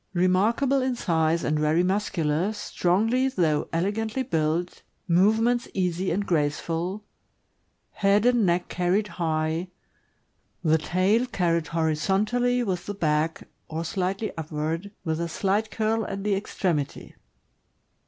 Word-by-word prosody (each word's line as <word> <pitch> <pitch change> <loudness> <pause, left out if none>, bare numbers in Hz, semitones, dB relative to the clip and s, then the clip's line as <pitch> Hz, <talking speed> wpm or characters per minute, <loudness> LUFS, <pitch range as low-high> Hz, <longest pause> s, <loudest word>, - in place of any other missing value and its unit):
Remarkable 215 +10 +2
in 255 -1 0
size 165 -6 +1
and 150 0 0
very 155 +3 +2
muscular, 180 -2 0
strongly 220 +6 +1
though 160 - +1
elegantly 215 +8 -1
built, 165 -3 -1 0.3
move 190 +6 +4
ments 240 +1 +1
easy 185 0 0
and 200 +4 -1
graceful; 165 +5 -1 0.9
head 200 +2 +2
and 245 -2 +4
neck 175 -1 +1
carried 185 +4 0
high; 160 0 -1 1.0
the 160 -1 +3
tail 190 +9 +1
carried 170 -7 0
horizontally 200 +10 +1
with 185 -5 -3
the 205 - -4
back, 160 -2 0 0.2
or 165 +1 -4
slightly 195 +4 -2
upward, 160 +4 -3 0.2
with 160 0 -1
a 170 - -2
slight 200 +5 0
curl 220 +1 0
at 195 0 -5
the 210 -1 +1
extremity. 180 -7 -2
180 Hz, 125 wpm, -25 LUFS, 165-210 Hz, 1.0 s, move